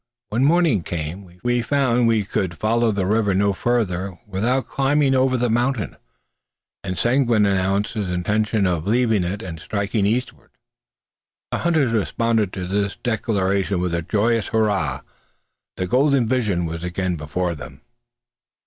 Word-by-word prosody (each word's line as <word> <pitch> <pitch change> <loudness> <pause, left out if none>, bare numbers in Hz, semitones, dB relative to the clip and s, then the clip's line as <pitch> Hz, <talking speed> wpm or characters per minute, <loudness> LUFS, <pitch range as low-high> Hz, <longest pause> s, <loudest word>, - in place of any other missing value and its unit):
When 120 +5 +1
morning 160 - +3
came, 85 +3 -6
we 120 0 +1
found 125 -2 +2
we 110 -2 +2
could 90 -3 -2
follow 115 +3 +2
the 100 -2 -1
river 105 -1 +1
no 100 +1 +2
farther 95 -5 -1
without 115 +6 0
climbing 140 0 +1
over 130 0 +2
the 125 0 +1
mountain; 120 -1 0 0.9
and 95 -2 -4
Seguin 120 -4 +3
announced 100 +1 +1
his 105 -5 -3
intention 105 +4 0
of 90 -1 -1
leaving 110 -3 +2
it 100 +5 -3
and 80 -3 -7
striking 100 +3 -1
eastward. 120 +4 -2 1.0
The - - -1
hunters 160 -8 +2
responded 115 -1 0
to 90 -2 -4
this 100 +2 -1
declaration 100 -5 0
with 90 -1 -1
a 85 - 0
joyous 110 +5 +1
hurrah. 110 -4 0 0.8
The 95 - -1
golden 130 +4 +2
vision 105 -8 0
was 85 +1 -5
again 90 +1 -2
before 85 +3 -2
them. 70 -2 -10
105 Hz, 145 wpm, -22 LUFS, 95-120 Hz, 1.0 s, morning